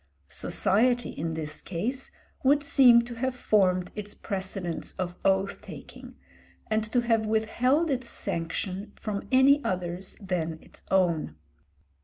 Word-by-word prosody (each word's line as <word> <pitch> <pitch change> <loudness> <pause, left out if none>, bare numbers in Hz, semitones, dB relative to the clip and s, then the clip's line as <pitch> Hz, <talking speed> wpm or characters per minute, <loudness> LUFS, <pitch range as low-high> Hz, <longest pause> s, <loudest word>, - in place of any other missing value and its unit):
Society 235 - +1
in 165 +1 -4
this 155 -1 -5
case 235 +10 -3 0.3
would 285 +2 +4
seem 250 -4 +6
to 240 0 -7
have 255 +2 -2
formed 185 -6 +2
its 210 -1 -7
precedents 190 -4 -4
of 180 -1 -4
oath 195 0 +1
taking, - - -11 0.6
and 215 0 +2
to 240 +3 +1
have 225 -2 +1
withheld 250 +8 +2
its 255 -2 -2
sanction 185 +4 -4
from 205 -2 -5
any 275 +2 +5
others 180 0 -3
than 175 -5 -2
its - - -15
own. 170 - +1
205 Hz, 130 wpm, -27 LUFS, 180-245 Hz, 0.6 s, seem